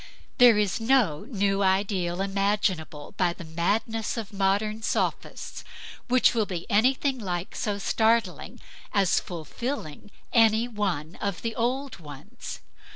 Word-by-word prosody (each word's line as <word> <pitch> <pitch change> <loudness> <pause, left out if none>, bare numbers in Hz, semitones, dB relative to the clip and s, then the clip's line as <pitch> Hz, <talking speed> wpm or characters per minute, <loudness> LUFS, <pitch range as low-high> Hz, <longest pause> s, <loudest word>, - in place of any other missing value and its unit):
There 245 -3 +8
is 205 -1 +1
no 225 - +2
new 200 -4 +1
ideal 190 -2 +1
imaginable 195 -6 -1
by 180 -2 +2
the 175 - -10
madness 205 +8 -1
of 220 -2 -5
modern 205 +3 0
sophists, - - -2 0.4
which 255 -1 +4
will 220 -3 +1
be 175 -3 -4
anything 260 +5 +2
like 180 -4 -4
so 205 -2 -1
startling 220 -1 0 0.3
as 195 -3 +3
fulfilling 175 - -6 0.2
any 225 0 +4
one 185 -8 -3
of 200 -3 -3
the 230 -1 -2
old 255 +1 -2
ones. 155 - -9
205 Hz, 125 wpm, -26 LUFS, 180-225 Hz, 0.4 s, There